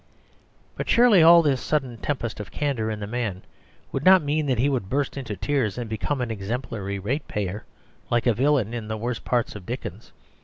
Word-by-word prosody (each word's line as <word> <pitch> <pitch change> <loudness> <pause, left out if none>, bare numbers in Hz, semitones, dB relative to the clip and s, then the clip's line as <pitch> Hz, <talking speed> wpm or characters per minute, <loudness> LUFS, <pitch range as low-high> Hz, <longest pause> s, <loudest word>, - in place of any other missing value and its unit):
But - - -5
surely 230 -6 +6
all 170 +1 +8
this 140 -4 +1
sudden 135 -6 -1
tempest 120 -4 -3
of 105 -4 -6
candour 130 -6 -1
in 110 -1 -3
the 105 - -4
man 105 -4 -3 0.5
would 135 - -3
not 185 -1 +7
mean 150 +1 0
that 130 -3 +1
he 125 +5 +2
would 125 -9 -1
burst 140 +2 -1
into 125 -7 -5
tears 110 0 -1
and 120 -2 -4
become 110 +6 -2
an 120 -2 -2
exemplary 105 -1 -4
ratepayer, 105 -3 -3 0.4
like 120 -1 +1
a 120 - +4
villain 130 -2 +1
in 115 -3 -5
the 110 0 -3
worst 120 +2 -3
parts 120 -3 0
of 105 - -8
Dickens. - - -6
120 Hz, 195 wpm, -24 LUFS, 105-145 Hz, 0.5 s, all